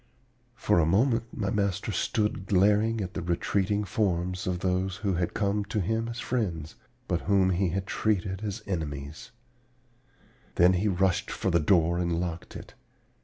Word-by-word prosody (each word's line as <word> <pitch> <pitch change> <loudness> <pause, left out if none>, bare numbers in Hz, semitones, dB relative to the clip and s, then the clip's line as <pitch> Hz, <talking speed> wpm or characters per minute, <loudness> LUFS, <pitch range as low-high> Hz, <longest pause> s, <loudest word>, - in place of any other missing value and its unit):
"For 105 -5 +2
a 80 - +4
moment 115 +6 +2
my 100 -2 -2
master 100 -4 -1
stood 105 -3 -1
glaring 105 +3 +3
at 95 -1 -4
the 95 - -3
retreating 95 +4 0
forms 90 -2 -1
of 90 -1 -1
those 95 0 0
who 100 - +2
had 85 0 -1
come 100 0 0
to 105 +1 -2
him 110 +4 -1
as 115 +1 -5
friends, 90 -12 -2 0.3
but 85 -1 0
whom 95 -2 +4
he 90 +1 +1
had 95 +3 -2
treated 95 -3 -1
as 100 -3 -4
enemies; 75 -5 -5 1.3
then 90 +1 +5
he 95 +4 +1
rushed 95 -2 +1
for 95 - -1
the 85 - +4
door 85 0 +3
and 85 -1 0
locked 85 -1 -5
it. - - -10
95 Hz, 165 wpm, -28 LUFS, 85-105 Hz, 1.3 s, then